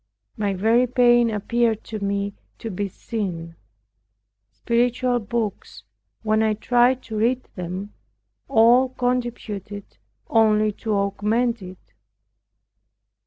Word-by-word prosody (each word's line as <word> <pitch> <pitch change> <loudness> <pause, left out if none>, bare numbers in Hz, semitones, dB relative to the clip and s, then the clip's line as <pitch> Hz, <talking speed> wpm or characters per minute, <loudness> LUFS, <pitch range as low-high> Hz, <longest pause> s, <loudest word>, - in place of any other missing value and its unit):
My 205 -2 -1
very 225 +6 +3
pain 240 -1 +4
appeared 225 +1 0
to 220 -1 -6
me 200 0 -1 0.2
to 225 - -6
be 200 +2 -2
sin. 175 -5 -5 0.9
Spiritual 245 - 0
books, 210 - -4 0.4
when 215 0 +2
I 220 -1 +2
tried 245 +3 +2
to 220 - -7
read 245 +4 +1
them, 185 +3 -6 0.5
all 245 +1 +5
contributed 240 -6 -4 0.3
only 215 -1 +3
to 215 +1 -4
augment 210 +4 0
it. 180 - -12
220 Hz, 105 wpm, -23 LUFS, 200-240 Hz, 0.9 s, all